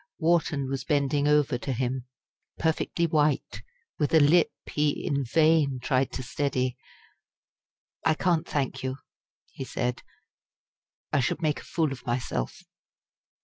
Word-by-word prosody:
Wharton 160 -4 +1
was 135 0 -3
bending 145 -1 +1
over 150 -4 +3
to 135 - -3
him 125 +1 -2 0.5
perfectly 160 +1 0
white, 150 -3 +1 0.4
with 150 +1 +2
a - - +8
lip 155 +4 +5
he 150 -1 0
in 140 -1 0
vain 150 0 +3
tried 130 +1 +1
to 130 - -4
steady. 130 -1 -1 1.3
"I 160 -1 +3
can't 170 -1 +1
thank 140 -3 -2
you," 130 0 -2 0.6
he - - -6
said; 125 -1 -2 1.1
"I - - +4
should 130 +6 -1
make 150 -2 +1
a - - -11
fool 160 -4 0
of 135 - -7
myself." 120 - -2
145 Hz, 135 wpm, -27 LUFS, 130-155 Hz, 1.3 s, a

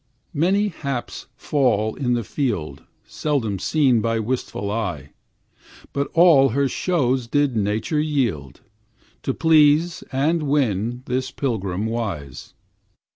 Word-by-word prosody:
Many 195 +7 +2
haps 140 -8 -5
fall 110 -7 +1
in 125 -3 -1
the 120 - -2
field 100 - -3 0.2
Seldom 120 -10 -2
seen 130 - +2
by 115 +1 0
wishful 110 -3 -3
eyes, 80 -11 -3 0.8
But 140 0 -1
all 165 -6 +6
her 140 +4 +1
shows 130 -6 0
did 145 0 +1
Nature 110 +7 0
yield, 115 - -2 0.6
To - - -2
please 160 +1 +4
and 150 +5 +1
win 125 -5 0
this 130 +1 -2
pilgrim 105 -8 -2
wise. 100 - -5
125 Hz, 115 wpm, -22 LUFS, 110-145 Hz, 0.8 s, all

